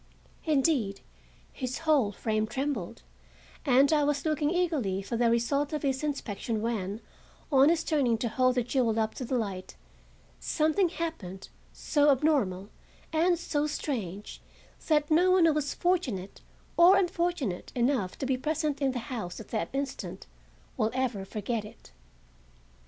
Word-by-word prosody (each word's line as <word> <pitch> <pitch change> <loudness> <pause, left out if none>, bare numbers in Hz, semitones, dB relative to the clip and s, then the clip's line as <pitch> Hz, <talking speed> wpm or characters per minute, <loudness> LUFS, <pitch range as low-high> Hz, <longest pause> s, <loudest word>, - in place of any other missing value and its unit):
Indeed, 270 -9 +1 0.5
his 255 -2 -4
whole 295 -10 +2
frame 215 +1 -1
trembled, 235 -3 -3 0.6
and 275 +3 +5
I 300 -1 +3
was 285 0 0
looking 305 -1 +1
eagerly 305 - 0
for 200 - -4
the 235 0 +3
result 275 +6 +1
of 300 - -2
his 270 0 0
inspection 225 -6 -3
when, 215 -2 -2 0.5
on 275 +1 +6
his 335 -1 +2
turning 270 -9 +1
to 235 - -2
hold 255 +2 +2
the 250 - +2
jewel 235 -2 +1
up 220 0 0
to 255 - -5
the 255 +2 -1
light, 195 -5 -4 0.6
something 315 - +1
happened 270 - -5 0.2
so 295 -1 +2
abnormal 255 -10 +1 0.4
and 340 +2 +3
so 300 -3 -1
strange 215 - -4 0.5
that 300 -1 +2
no 350 +4 +5
one 365 -2 +5
who 320 - +4
was 295 -1 -2
fortunate 270 - -1 0.4
(or 360 +3 +8
unfortunate) 345 - -1
enough 240 -6 0
to - - -3
be 260 -1 +1
present 300 +1 -1
in 270 -2 +1
the - - -3 0.2
house 190 -7 -5
at 220 - -10
that 220 - -2
instant 275 0 -4 0.5
will 220 -3 +2
ever 245 -7 -1
forget 215 +3 -3
it. 210 - -14
265 Hz, 150 wpm, -29 LUFS, 220-305 Hz, 0.6 s, or